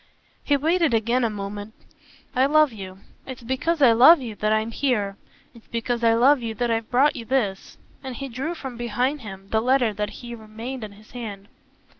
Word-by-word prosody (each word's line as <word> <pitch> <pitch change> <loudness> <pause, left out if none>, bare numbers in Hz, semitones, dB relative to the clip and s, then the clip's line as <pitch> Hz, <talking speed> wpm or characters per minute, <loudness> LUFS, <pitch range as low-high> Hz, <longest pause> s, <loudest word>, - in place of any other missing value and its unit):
He 285 - +2
waited 320 -2 +2
again 235 +3 +1
a 230 - +2
moment. 205 +1 -6 0.6
"I 260 +2 +4
love 305 -3 +4
you. 190 -2 -9 0.3
It's 260 -2 -8
because 280 +6 0
I 245 - +8
love 260 +9 +8
you 240 -4 -6
that 215 0 0
I'm 220 +1 +1
here. 220 -7 0 0.4
It's 230 -2 -18
because 235 +1 -2
I 225 0 +5
love 260 +3 +4
you 225 -1 -4
that 240 +2 -1
I've 225 -1 -1
brought 275 +4 +3
you 235 - -6
this." 225 -6 -2 0.3
And 260 -2 -6
he 275 +3 -5
drew 270 +7 -4
from 265 -6 -7
behind 245 +5 -1
him 195 -3 -10
the 220 - +2
letter 250 -2 +2
that 210 +1 -3
had 235 +2 -9
remained 225 +4 -7
in 210 -1 -8
his 215 +1 -18
hand. 205 -5 -8
235 Hz, 200 wpm, -24 LUFS, 215-265 Hz, 0.6 s, I